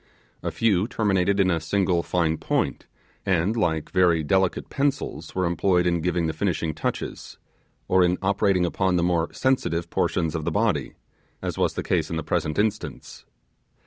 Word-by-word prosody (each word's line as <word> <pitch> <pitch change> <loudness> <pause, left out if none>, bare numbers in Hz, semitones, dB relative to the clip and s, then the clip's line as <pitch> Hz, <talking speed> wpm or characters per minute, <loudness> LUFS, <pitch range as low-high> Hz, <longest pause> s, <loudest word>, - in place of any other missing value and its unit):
A - - -2
few 105 -3 +1
terminated 100 -4 +1
in 95 -1 +4
a 85 - +1
single 90 +1 +1
fine 85 -2 0
point, - - -1 0.4
and, 95 +3 +1
like 80 -8 -1
very 90 -4 +3
delicate 95 +4 +1
pencils, 140 0 -2
were 95 0 +1
employed 90 +1 +2
in 85 -1 +1
giving 90 0 0
the 80 - -1
finishing 80 -2 -1
touches, 80 - -4 0.5
or 95 0 +4
in 90 0 +2
operating 95 -2 +2
upon 95 +1 0
the 85 - +2
more 85 -1 +1
sensitive 125 -10 0
portions 80 -4 0
of 80 - -3
the - - 0
body, - - 0 0.5
as - - -2
was - - 0
the - - -2
case 80 -4 0
in 85 - -3
the 80 - -3
present 75 - -1
instance. 105 0 -3
90 Hz, 170 wpm, -24 LUFS, 85-95 Hz, 0.5 s, in